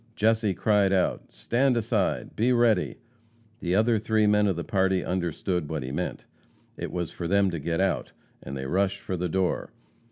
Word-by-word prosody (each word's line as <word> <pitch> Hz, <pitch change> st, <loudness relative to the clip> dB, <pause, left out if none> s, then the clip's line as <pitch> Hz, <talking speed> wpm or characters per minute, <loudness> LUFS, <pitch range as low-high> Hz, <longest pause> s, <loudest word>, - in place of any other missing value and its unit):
Jesse 110 Hz, -2 st, +2 dB
cried 105 Hz, -3 st, +2 dB
out: 95 Hz, -2 st, 0 dB
"Stand 120 Hz, -, +1 dB
aside! 110 Hz, -3 st, -1 dB
Be 120 Hz, +4 st, +2 dB
ready!" 120 Hz, -6 st, +2 dB, 0.6 s
The 90 Hz, +1 st, -1 dB
other 110 Hz, +2 st, +3 dB
three 110 Hz, 0 st, +2 dB
men 105 Hz, 0 st, +4 dB
of 95 Hz, -, +1 dB
the 85 Hz, -, -4 dB
party 95 Hz, -4 st, +1 dB
understood 90 Hz, -2 st, -2 dB
what 80 Hz, -4 st, -3 dB
he 65 Hz, -, -5 dB
meant. -, -, -4 dB, 0.5 s
It -, -, -5 dB
was 90 Hz, -2 st, -3 dB
for 85 Hz, -, -5 dB
them 100 Hz, +1 st, +3 dB
to 85 Hz, -, -3 dB
get 80 Hz, +3 st, -2 dB
out, 95 Hz, -, 0 dB, 0.3 s
and 70 Hz, +1 st, -6 dB
they 65 Hz, -, -5 dB
rushed 95 Hz, +6 st, 0 dB
for 95 Hz, -, -3 dB
the 90 Hz, 0 st, -2 dB
door. 95 Hz, +1 st, 0 dB
95 Hz, 185 wpm, -26 LUFS, 85-110 Hz, 0.6 s, men